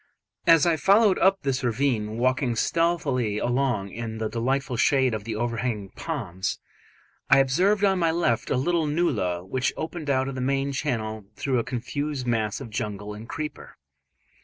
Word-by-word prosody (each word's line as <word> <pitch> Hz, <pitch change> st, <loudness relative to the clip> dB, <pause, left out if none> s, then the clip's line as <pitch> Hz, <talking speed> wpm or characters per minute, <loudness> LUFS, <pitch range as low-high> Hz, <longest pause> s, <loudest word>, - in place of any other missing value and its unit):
As 165 Hz, -3 st, +7 dB
I 170 Hz, -2 st, +3 dB
followed 200 Hz, +5 st, +4 dB
up 195 Hz, 0 st, +3 dB
this 135 Hz, -1 st, -1 dB
ravine, 115 Hz, -3 st, 0 dB
walking 125 Hz, 0 st, +1 dB
stealthily 135 Hz, -7 st, +1 dB
along 120 Hz, -5 st, 0 dB
in 115 Hz, 0 st, -5 dB
the 110 Hz, -1 st, -2 dB
delightful 130 Hz, +3 st, -1 dB
shade 130 Hz, +1 st, +3 dB
of 105 Hz, -2 st, -4 dB
the 110 Hz, -1 st, -3 dB
overhanging 115 Hz, -3 st, -2 dB
palms, 100 Hz, -, -4 dB, 0.7 s
I 135 Hz, -, +7 dB
observed 180 Hz, +10 st, +3 dB
on 190 Hz, -2 st, +3 dB
my 165 Hz, -2 st, +3 dB
left 160 Hz, -9 st, 0 dB
a -, -, +1 dB
little 165 Hz, +4 st, +1 dB
nullah 105 Hz, -, 0 dB
which 130 Hz, +6 st, 0 dB
opened 160 Hz, -1 st, -5 dB
out 130 Hz, -1 st, +2 dB
of 135 Hz, -, -4 dB
the 130 Hz, -, -4 dB
main 135 Hz, +1 st, 0 dB
channel 110 Hz, -4 st, -3 dB
through 130 Hz, -3 st, 0 dB
a -, -, 0 dB
confused 135 Hz, +3 st, -3 dB
mass 110 Hz, -3 st, 0 dB
of 125 Hz, -5 st, -8 dB
jungle 105 Hz, -1 st, -4 dB
and 110 Hz, +3 st, -10 dB
creeper. 155 Hz, -1 st, -6 dB
130 Hz, 165 wpm, -25 LUFS, 110-150 Hz, 0.7 s, As